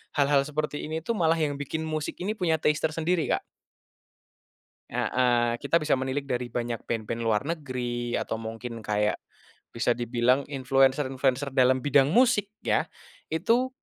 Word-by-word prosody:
hal-hal 140 -1 +4
seperti 150 +1 -3
ini 160 +1 -3
tuh, 235 - 0
malah 165 -6 +2
yang 155 -3 0
bikin 145 +3 -4
musik 155 -1 -3
ini 200 +4 -2
punya 175 -6 +1
taste 150 0 +1
tersendiri, 165 +1 0
Kak. - - +1 1.5
Heeh, 120 -2 +1
kita 140 +4 +1
bisa 155 -2 +1
menilik 130 +2 -2
dari 125 -2 -2
banyak 120 -1 -3
band-band 115 0 -2
luar 115 0 +1
negeri, 125 -6 -3
atau 110 - -3
mungkin 115 +1 -6
kayak 105 0 0 0.5
bisa 120 +1 +1
dibilang 120 +3 +1
influencer-influencer 135 0 +1
dalam 130 0 +3
bidang 140 -1 +4
musik, 230 - +3 0.2
ya. - - +1 0.4
Itu, 230 +11 +2
135 Hz, 145 wpm, -27 LUFS, 120-155 Hz, 1.5 s, hal-hal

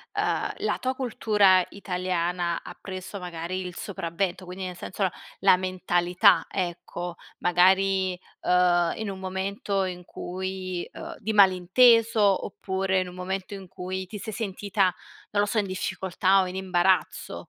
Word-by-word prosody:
uhm, - - 0
la - - -1
tua 260 0 -1
cultura 210 -7 +3
italiana 180 -2 -2
ha - - -9
preso 190 +1 -7
magari 175 +1 -4
il 180 - -7
sopravvento. 185 0 -3
Quindi 185 +1 -6
nel 180 -1 -5
senso 195 +3 -4
no, 185 - +3 0.3
la - - +6
mentalità, 185 +1 +3
ecco, 175 -1 -4 0.2
magari, 185 +1 +3 0.2
uhm, 175 -1 +3
in 220 -2 -3
un 190 -1 -6
momento 195 +1 -2
in 180 -1 -6
cui, 185 0 -5
uhm - - -8
di 220 - -2
malinteso 205 +2 +5
oppure 190 -1 -1
in 185 - -2
un 180 - -10
momento 190 +2 -4
in 195 -2 -8
cui 185 0 -5
ti 210 - -7
sei 215 +2 -6
sentita, 200 -3 0 0.4
non 205 0 +2
lo - - +2
so, 220 - -2
in 205 -2 +1
difficoltà 190 +1 +1
o 185 - -1
in 180 - -6
imbarazzo? 185 -1 +1
185 Hz, 150 wpm, -26 LUFS, 180-195 Hz, 0.4 s, la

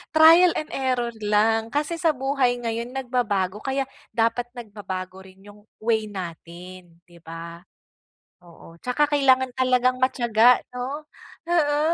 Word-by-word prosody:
trial 330 +3 +8
and 305 - -4
error 250 -3 -1
lang. 220 +2 +2
Kasi 295 +3 -1
sa 330 - +3
buhay 270 -3 0
ngayon 230 0 -3
nagbabago 220 -7 -1
kaya 270 0 -1 0.3
dapat 230 +2 0
nagbabago 190 -4 -7
rin 190 0 -17
yung 205 0 -15 0.2
way 220 -1 0
natin, 175 -1 -9
'di 170 -1 -19
ba? 165 +1 -9 0.8
Oo, 170 -1 -16
tsaka 250 +4 +1
kailangan 260 -3 +3
talagang 255 -1 +2
matiyaga 240 -2 +4
'no. 270 +5 -5 0.4
Oo, 295 -4 +2
235 Hz, 125 wpm, -23 LUFS, 195-265 Hz, 0.8 s, trial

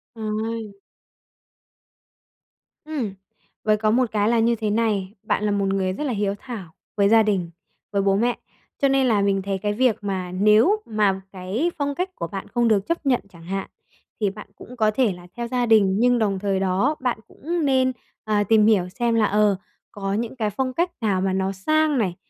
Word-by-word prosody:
Trời. 220 0 -3 2.1
Ừm, 275 -10 -3 0.5
với 215 -1 +3
có 215 0 +1
một 245 0 +2
cái 210 0 +1
là 235 0 +3
như 235 +1 +3
thế 220 -1 -2
này, 205 -3 0
bạn - - 0
là 210 - +1
một 200 -1 +1
người 190 -1 0
rất 295 - -4
là 275 -4 -1
hiếu 200 -1 -1
thảo 220 -11 -8 0.2
với 200 -1 +4
gia 225 0 +6
đình, 190 -5 0 0.4
với 200 -1 +1
bố 195 0 +2
mẹ. 235 +4 +1 0.4
Cho 275 - +5
nên 270 -1 +3
là 215 -4 +3
mình 200 -1 +1
thấy 195 0 -2
cái 205 +2 -1
việc 245 0 +2
mà 190 -3 -3
nếu 215 - +4
mà 205 -3 +1
cái 195 - -2
phong 285 -1 -1
cách 365 +4 -2
của 170 - -4
bạn 195 +3 -6
không 240 -1 +1
được 205 -3 +2
chấp 335 -2 -2
nhận 255 -3 +2
chẳng 170 -3 -15
hạn, 195 +3 -4 0.5
thì 205 - +2
bạn 210 +2 -10
cũng 250 - -12
có 215 -2 +3
thể 225 -2 +1
là 175 0 -13
theo 235 - -3
gia 245 0 0
đình, 210 -4 +4
nhưng 245 0 +4
đồng 200 -3 0
thời 195 -1 0
đó 195 +10 +1
bạn 250 -3 -1
cũng 335 +1 -3
nên, 260 -2 +3 0.3
à, 210 -1 +2
tìm 215 +1 +4
hiểu 200 -5 +3
xem 235 +4 0
là, 220 -2 +4
ờ, 210 -1 +3 0.4
có 195 -1 -3
những 225 +4 -2
cái 220 -4 -1
phong 255 +5 -2
cách 345 +5 0
nào 200 -4 +1
mà 190 0 0
nó 190 0 0
sang 305 +10 +1
này, 190 -7 0
215 Hz, 205 wpm, -23 LUFS, 195-240 Hz, 2.1 s, gia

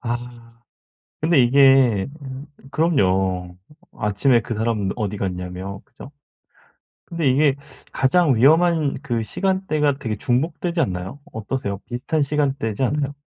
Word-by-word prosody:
아. 120 -1 -2 1.0
근데 155 -2 +3
이게 130 -5 +5 0.2
음 135 +2 -8 0.2
그럼요. 95 - 0 0.4
아침에 110 +4 +2
그 115 - -5
사람은 110 -3 -1
어디 105 -2 -3
갔냐며 95 +1 -5
그죠? 135 0 -13 1.0
근데 165 -5 -1
이게 140 +1 +3 0.4
가장 145 0 +3
위험한 160 +4 +3
그 120 -4 -1
시간대가 155 - 0
되게 110 -4 -3
중복되지 150 - -1
않나요? 95 - -3
어떠세요? 110 -1 -4
비슷한 130 +6 -2
시간대지 135 -5 -1
않아요? 140 +1 -1
130 Hz, 270 characters per minute, -21 LUFS, 105-145 Hz, 1.0 s, 이게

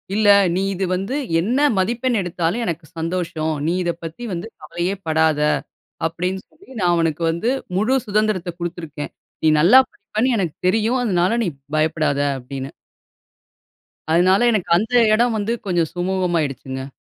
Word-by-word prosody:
"இல்ல, 215 0 +2 0.3
நீ 185 - +1
இது 190 +1 -1
வந்து 195 +8 -3 0.3
என்ன 235 +9 0 0.2
மதிப்பெண் 235 +5 0
எடுத்தாலும் 180 +4 -1
எனக்கு 165 -3 -4
சந்தோஷம். 165 -1 -2
நீ 170 - +1
இத 175 - 0
பத்தி 165 +8 -7
வந்து 175 +5 -4
கவலையே 175 +3 -3
படாத" 160 -1 +2 0.7
அப்டினு 180 +3 -2
சொல்லி 385 +5 -22
நா 185 - +1
அவனுக்கு 165 -1 0
வந்து 170 +8 -1 0.3
முழு 220 +7 +2
சுதந்திரத்த 210 -3 0
குடுத்திருக்கேன். 165 -4 -5 0.3
"நீ - - +4
நல்லா 195 +12 +8
படிப்பனு 220 +5 -1
எனக்கு 175 -6 -2
தெரியும் 225 +6 +2
அதுனால 190 0 +1
நீ 190 - 0 0.3
பயப்படாத" 155 -2 +1 0.2
அப்டின்னு. 135 +1 -7 1.4
அதுனால, 180 +4 +4
எனக்கு 210 -6 -1
அந்த 220 +6 -2 0.2
இடம் 235 +1 +2
வந்து 215 +2 -1
கொஞ்சம் 175 -4 0
சுமூகமாயிடுச்சுங்க. 165 -8 -2
180 Hz, 135 wpm, -21 LUFS, 160-215 Hz, 1.4 s, நல்லா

